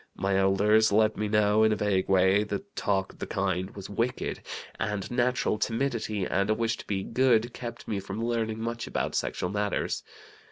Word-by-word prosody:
My 95 0 0
elders 105 +3 +4
let 110 +1 +3
me 105 - -1
know, 105 0 +3
in 110 0 +5
a - - +2
vague 100 -3 0
way, 95 +2 +4
that 200 - -6
talk 95 -2 0
of - - -21
the - - -4
kind 95 -1 -1
was 100 -2 -7
wicked, 115 +5 -2 0.4
and 105 0 -2
natural 120 -3 +1
timidity 115 -4 -1
and 100 +3 0
a 110 - +3
wish 115 0 0
to - - -11
be 95 -2 -1
'good' 120 -1 +2
kept 120 -1 -7
me 105 - -1
from 105 +4 -4
learning 110 -2 -1
much 115 +1 -3
about - - -2
sexual 90 - -1
matters. 105 -1 -1
105 Hz, 190 wpm, -28 LUFS, 100-115 Hz, 0.4 s, in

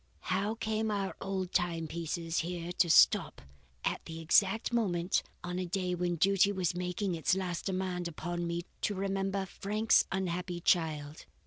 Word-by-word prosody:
How 200 +4 0
came 220 -1 -1
our 200 -2 -2
old 190 -2 -3
timepiece 165 -1 -1
here 175 0 -3
to 180 -1 +2
stop - - +5 0.5
at - - -1
that - - -10
exact 195 +8 +3
moment 185 -6 +1 0.2
on 180 +1 -3
a 185 - -2
day 180 0 -1
when 175 0 0
Duty 195 +3 +4
was 185 -3 0
making 180 +2 -2
its 165 +2 +1
last 180 -3 -3
demand 185 -2 -2
upon 175 +1 -4
me 170 0 -2 0.2
to 205 - 0
remember 195 0 -1
Frank's 210 +4 +2
unhappy 180 -2 -2
child? 155 -4 0
180 Hz, 150 wpm, -32 LUFS, 170-195 Hz, 0.5 s, stop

